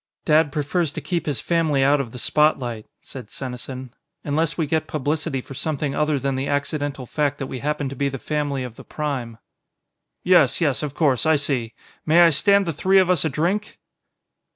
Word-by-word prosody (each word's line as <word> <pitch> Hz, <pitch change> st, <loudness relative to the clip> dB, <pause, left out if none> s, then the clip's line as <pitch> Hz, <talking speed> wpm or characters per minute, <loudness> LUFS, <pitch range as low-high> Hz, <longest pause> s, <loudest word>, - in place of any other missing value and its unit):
"Dad 155 Hz, -1 st, +4 dB
prefers 150 Hz, +2 st, -1 dB
to -, -, -4 dB
keep 170 Hz, -4 st, -3 dB
his 145 Hz, -4 st, 0 dB
family 160 Hz, -5 st, +1 dB
out 140 Hz, +1 st, +4 dB
of 120 Hz, -4 st, -7 dB
the 125 Hz, -, -9 dB
spotlight," 125 Hz, -5 st, +1 dB
said 125 Hz, -5 st, -10 dB
Senesin, 130 Hz, 0 st, -7 dB, 0.3 s
"unless 155 Hz, +2 st, 0 dB
we 165 Hz, -, +1 dB
get 160 Hz, +2 st, -1 dB
publicity 145 Hz, -2 st, -2 dB
for 135 Hz, -, -11 dB
something 145 Hz, 0 st, -2 dB
other 150 Hz, 0 st, +1 dB
than 135 Hz, 0 st, -1 dB
the 135 Hz, +1 st, -2 dB
accidental 145 Hz, -1 st, -2 dB
fact 145 Hz, +2 st, -1 dB
that 135 Hz, -, -4 dB
we 130 Hz, -1 st, -6 dB
happen 150 Hz, +1 st, -2 dB
to 135 Hz, -, -6 dB
be 140 Hz, +2 st, 0 dB
the 135 Hz, -, -5 dB
family 145 Hz, -1 st, -2 dB
of 125 Hz, -3 st, -8 dB
the -, -, -10 dB
Prime." 130 Hz, -7 st, -4 dB, 0.9 s
"Yes, 175 Hz, -8 st, +4 dB
yes, 145 Hz, -7 st, +1 dB
of 145 Hz, -2 st, -4 dB
course. 145 Hz, -2 st, +2 dB
I 160 Hz, -, +5 dB
see. 135 Hz, -6 st, -2 dB, 0.3 s
May 165 Hz, +3 st, +5 dB
I 170 Hz, -1 st, +7 dB
stand 200 Hz, +6 st, +3 dB
the 165 Hz, -, -2 dB
three 190 Hz, +6 st, +3 dB
of 185 Hz, -1 st, +5 dB
us 180 Hz, -, +2 dB
a -, -, +1 dB
drink?" 175 Hz, +9 st, -1 dB
145 Hz, 200 wpm, -22 LUFS, 135-160 Hz, 0.9 s, I